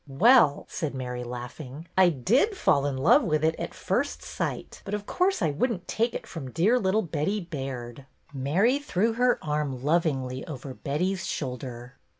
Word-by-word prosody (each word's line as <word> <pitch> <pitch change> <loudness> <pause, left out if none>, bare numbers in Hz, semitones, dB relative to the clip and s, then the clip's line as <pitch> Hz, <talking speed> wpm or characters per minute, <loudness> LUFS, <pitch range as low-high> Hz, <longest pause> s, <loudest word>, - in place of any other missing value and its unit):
Well," 170 - +5
said 150 -4 -4
Mary, 125 -1 -4
laughing, 125 +5 -7
'' - - -38
I - - +5
did 245 - +2
fall 140 - +3
in 135 -2 -2
love 215 - +5
with 155 - 0
it 160 0 +3
at - - -5
first - - -1
sight, - - -4
but 200 - -3
of 205 -1 -5
course 375 - +1
I 160 - +2
would 235 - 0
n't 180 -5 -6
take 230 +2 0
it - - -5
from 145 -7 -7
dear 200 - +3
little 205 +2 +1
Betty 165 +5 -1
Baird." 135 - -6 0.3
Mary 180 - +2
threw 225 -5 0
her 245 +1 +3
arm 150 -4 -2
lovingly 140 -6 0
over 135 -3 -7
Betty's 180 +9 -2
shoulder. 125 -3 -5
155 Hz, 175 wpm, -27 LUFS, 135-205 Hz, 0.3 s, Well